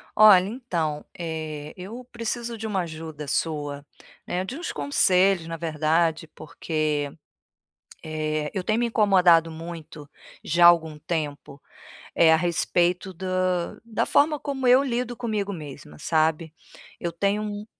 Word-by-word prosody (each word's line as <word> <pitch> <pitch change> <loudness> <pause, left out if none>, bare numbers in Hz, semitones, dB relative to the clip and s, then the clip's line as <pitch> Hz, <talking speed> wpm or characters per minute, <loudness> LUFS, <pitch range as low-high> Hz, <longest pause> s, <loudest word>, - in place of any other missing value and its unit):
Olha, 200 -3 +7
então, 170 - -3
eh, 155 -3 -5
eu 215 +7 -8
preciso 235 0 -4
de 220 - -6
uma 195 -3 0
ajuda 160 -3 -7
sua, 145 -2 -2 0.4
né, 180 +1 -1
de 255 +8 -6
uns 345 - -4
conselhos 180 +5 +2
na 165 0 -5
verdade, 160 0 0
porque, 150 -2 -2 0.9
eh, 155 -1 -2
eu 190 - -2
tenho 215 +4 0
me 240 - +1
incomodado 185 -7 +4
muito, 160 -2 -9 0.4
já 170 +2 +3
há - - +11
algum 160 -3 +3
tempo, 145 -3 -4 0.6
eh, 165 -1 +6
a - - +7
respeito 175 +2 0
da 185 -1 -1
da 225 -3 -1
forma 300 0 +3
como 270 -3 -2
eu 255 +2 +6
lido 245 -2 -2
comigo 215 -4 -2
mesma, 145 - -10
sabe. 160 0 0 0.5
Eu 170 - -3
tenho 200 +5 0
um 205 0 -5
170 Hz, 140 wpm, -25 LUFS, 155-205 Hz, 0.9 s, há